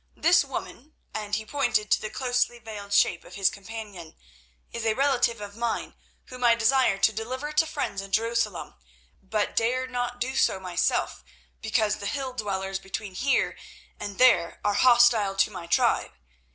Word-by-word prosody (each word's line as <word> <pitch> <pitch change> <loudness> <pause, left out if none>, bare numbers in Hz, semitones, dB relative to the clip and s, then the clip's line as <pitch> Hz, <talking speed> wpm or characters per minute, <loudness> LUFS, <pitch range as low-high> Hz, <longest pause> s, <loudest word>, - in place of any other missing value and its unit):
This 345 0 +4
woman," 275 +1 -8 0.2
and 210 -1 -3
he 220 0 -4
pointed 215 -6 0
to - - +4
the 215 - -4
closely 245 0 0
veiled 210 -3 -9
shape 180 -3 +3
of 180 - -13
his 195 -1 +2
companion, 200 -5 -9 0.6
"is 235 - -5
a 220 -1 +1
relative 260 -4 +2
of 205 0 -8
mine 235 0 -3 0.3
whom 250 -1 -9
I 235 -1 +6
desire 235 -2 +3
to 210 +3 +3
deliver 255 +7 -4
to 305 +1 +2
friends 285 -10 -3
in 195 0 -10
Jerusalem, 225 -2 -1 0.5
but 210 +2 -2
dare 250 +3 +1
not 245 -1 -4
do 260 +2 -2
so 190 - +2
myself 175 - -1 0.4
because 210 -1 +1
the 200 - -5
hilldwellers 205 -8 -3
between 195 +1 -6
here 270 +8 +1 0.4
and 200 -1 -6
there 180 -10 +4
are 205 - +2
hostile 235 -4 +5
to 195 - +2
my 175 -4 -8
tribe. 170 - +2
220 Hz, 165 wpm, -26 LUFS, 200-250 Hz, 0.6 s, I